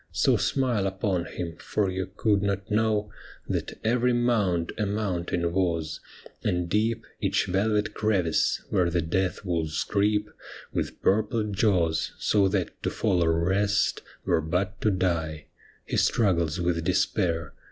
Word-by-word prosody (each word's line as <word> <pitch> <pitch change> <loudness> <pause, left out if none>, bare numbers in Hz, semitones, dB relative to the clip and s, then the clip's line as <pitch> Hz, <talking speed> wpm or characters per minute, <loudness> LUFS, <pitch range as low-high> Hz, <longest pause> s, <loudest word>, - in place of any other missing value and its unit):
' - - -41
So - - +5
smile 120 -8 +1
upon 95 -2 -1
him, 85 -2 -6
for 105 +3 -1
you 95 0 -3
could 100 +1 +1
not 100 0 -2
know 105 -1 +1 0.4
That - - -3
every 125 +2 +2
mound 105 -9 +1
a 105 - +1
mountain 90 -4 -1
was, 85 -4 0 0.4
and 90 -1 0
deep 110 +4 0
Each - - +1
velvet 105 +3 0
crevice 95 -7 +1
— - - -30
where 90 -1 +2
the 85 -1 0
death 95 +4 -1
wolves 80 -3 -1
creep 105 +1 +1 0.5
With - - -3
purple 110 +2 +2
jaws, 95 -5 +1
— - - -29
so 100 -2 +4
that 95 -2 -2
to - - 0
fall 90 -1 +1
or 85 0 +2
rest 100 +2 +1 0.2
Were 80 - +2
but 95 +5 -2
to 110 - +3
die. 85 -5 -1 0.4
He - - -2
struggles 85 -6 +2
with 85 -1 0
despair. 80 -2 0
95 Hz, 150 wpm, -26 LUFS, 85-105 Hz, 0.5 s, So